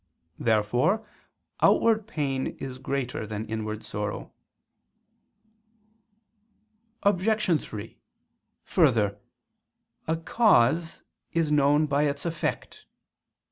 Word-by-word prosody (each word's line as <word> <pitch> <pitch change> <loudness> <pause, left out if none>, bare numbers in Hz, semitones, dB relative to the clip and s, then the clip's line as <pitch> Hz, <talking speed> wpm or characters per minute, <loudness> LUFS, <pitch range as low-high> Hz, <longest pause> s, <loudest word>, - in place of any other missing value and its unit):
Therefore 120 - +1 0.5
outward 220 -2 +4
pain 140 - -2
is 130 -1 -6
greater 130 -5 -3
than 105 +1 -4
inward 110 -1 -4
sorrow. 105 0 -5 2.7
Obj. 200 -3 +2
3: 110 +1 -8 0.6
Further, 105 -2 +2 0.9
a 160 +1 +1
cause 165 - +2 0.3
is 165 -3 +1
known 145 +1 +4
by 145 0 +1
its 140 +2 -3
effect. 165 -2 -4
140 Hz, 80 wpm, -27 LUFS, 110-170 Hz, 2.7 s, outward